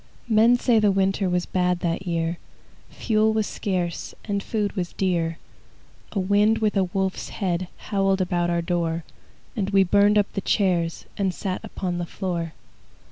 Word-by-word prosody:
Men 230 +2 +5
say 240 -2 +3
the 210 -1 +4
winter 195 0 +1
Was 180 0 0
bad 180 -1 0
that 175 +2 -2
year; 170 0 -1 0.5
Fuel 220 -1 +1
was 220 -1 +1
scarce, 180 -5 -3
And 200 -2 -1
food 210 -1 -1
was 180 -2 -3
dear. 170 -3 0 0.8
A 200 - 0
wind 205 +3 +3
with 215 -1 0
a 195 -1 +3
wolf's 190 +1 -2
head 180 -3 -2
Howled 195 -2 0
about 175 -2 0
our 170 -1 0
door, 170 -1 -1 0.5
And 200 -3 -1
we 195 -1 +5
burned 205 +3 +4
up 205 -1 +1
the 195 - -2
chairs 175 -6 0
And 195 -2 +1
sat 185 -2 -3
upon 180 -2 -3
the 175 - -3
floor. 170 -4 -3
190 Hz, 165 wpm, -24 LUFS, 175-205 Hz, 0.8 s, Men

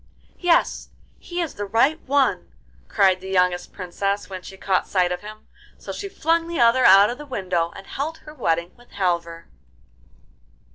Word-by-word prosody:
'Yes, 350 -2 +1 0.3
he 350 0 -4
is 330 - -3
the 205 - -5
right 260 +10 +2
one,' 265 -10 +1 0.4
cried 185 -1 +3
the 190 - -8
youngest 180 -1 +1
Princess 195 +2 -3
when 185 -1 -6
she 190 +1 -11
caught 190 -1 0
sight 180 -2 +1
of 180 - -3
him; 215 +1 -11 0.3
so - - -8
she 400 - -6
flung 330 -2 0
the 340 -1 -4
other 240 +2 +4
out 200 +3 +7
of 250 - -7
the 295 - -8
window 180 -9 -1
and 195 - -10
held 310 +8 -4
her 300 - -10
wedding 170 - -1
with 245 0 -21
Halvor. 170 -3 -2
200 Hz, 175 wpm, -23 LUFS, 180-280 Hz, 0.4 s, out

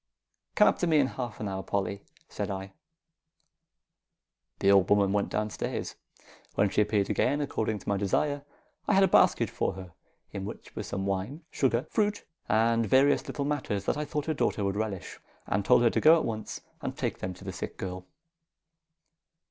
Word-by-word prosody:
"Come 210 - +6
up - - +2
to 175 - +1
me 160 -2 +4
in 145 - +5
half 125 -4 -5
an 105 - -3
hour, 95 -1 -3
Polly," 100 0 -2 0.3
said - - -4
I. 95 0 -5 1.8
The 100 - +3
old 95 -2 +5
woman 100 -1 +4
went 100 -1 +1
down 105 0 -1
stairs. - - -4 0.6
When 100 -1 +2
she - - +3
appeared 105 -1 +1
again, 145 - +1
according 110 -7 -1
to - - -14
my 100 - +1
desire, 140 +9 0 0.4
I - - +3
had 195 - +6
a - - +6
basket - - +4
for - - -1
her, 90 -2 -10 0.4
in 100 -2 -5
which 100 - -9
were - - -3
some 95 0 -4
wine, 100 - -3
sugar, 125 -2 +1
fruit, 210 -1 0 0.2
and 115 +2 +3
various 135 +5 +4
little 140 - -3
matters 130 -9 -2
that - - +1
I 150 - -2
thought 150 0 -3
her 160 - 0
daughter 110 -7 0
would 100 0 0
relish, 105 -3 -4 0.3
and 100 +1 0
told 120 - +5
her 115 - +4
to - - 0
go 160 +2 +8
at - - -1
once 110 -2 -4 0.2
and - - -4
take - - -2
them 95 0 -4
to 90 - -14
the 95 -1 -5
sick 95 - -6
girl. 90 -1 -6
105 Hz, 195 wpm, -29 LUFS, 95-140 Hz, 1.8 s, go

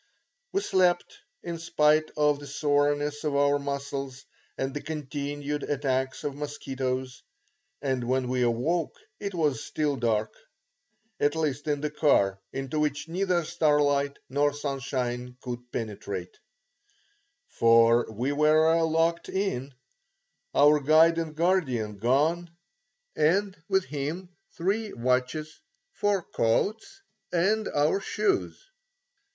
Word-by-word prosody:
We 395 - 0
slept, 185 - +1 0.2
in 170 -1 -5
spite 155 -1 +2
of 150 -1 +3
the 145 - -9
soreness 145 +1 0
of 150 -2 -1
our 145 0 +3
muscles 140 -1 -5 0.3
and 135 0 -2
the 145 - -4
continued 145 -1 -4
attacks 130 -2 -1
of 145 - -2
mosquitoes, 130 -3 -4 0.6
and 130 -3 -1
when 130 +1 0
we 125 0 0
awoke 125 +8 0 0.2
it 200 -2 -4
was 150 -4 0
still 150 -2 -1
dark; 110 -3 0 0.9
at 145 +2 +2
least 150 -2 -2
in 145 -1 0
the 150 0 -2
car, 100 -11 +2
into 135 +3 -3
which 150 0 -1
neither 180 0 +1
starlight 145 -3 +2
nor 145 +2 +1
sunshine 125 -3 -3
could 125 -1 -7
penetrate, 100 -5 -5 1.1
for 115 0 +4
we 120 +6 -2
were 155 +2 +4
locked 165 +1 +1
in, 190 -9 -2 0.8
our 150 +1 +6
guide 160 +3 +5
and 160 -2 -4
guardian 140 - 0
gone, 150 - +1 0.7
and 190 +5 +2
with 190 -1 +2
him 155 +6 -4 0.3
three 205 +5 -1
watches, 130 +5 -1 0.3
four 205 -3 0
coats 220 - -1 0.3
and 200 +5 +1
our 150 +6 +1
shoes. 385 - -1
145 Hz, 115 wpm, -27 LUFS, 130-165 Hz, 1.1 s, our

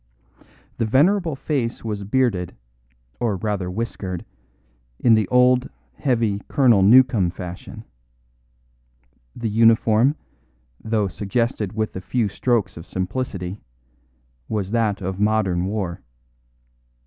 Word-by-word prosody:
The 115 - +1
venerable 165 - +3
face 130 -4 -2
was 105 -2 -3
bearded, 105 -5 0 0.6
or 115 -4 0
rather 100 -2 -2
whiskered, 95 -3 -4 0.7
in 120 - +4
the 110 -3 +3
old, 125 0 +3 0.2
heavy 115 - 0
Colonel 125 -8 +4
Newcome 115 -2 +5
fashion. 90 0 -8 1.5
The 115 - -3
uniform, 115 +4 +4 0.7
though 110 -2 0
suggested 105 +2 -2
with 110 0 -2
the 95 - -6
few 100 +4 -1
strokes 110 -2 0
of 85 - -10
simplicity, 95 -1 -4 0.9
was 100 -3 -2
that 110 -4 0
of 95 +1 -4
modern 105 -4 +1
war. 95 -3 -3
110 Hz, 105 wpm, -22 LUFS, 95-120 Hz, 1.5 s, Newcome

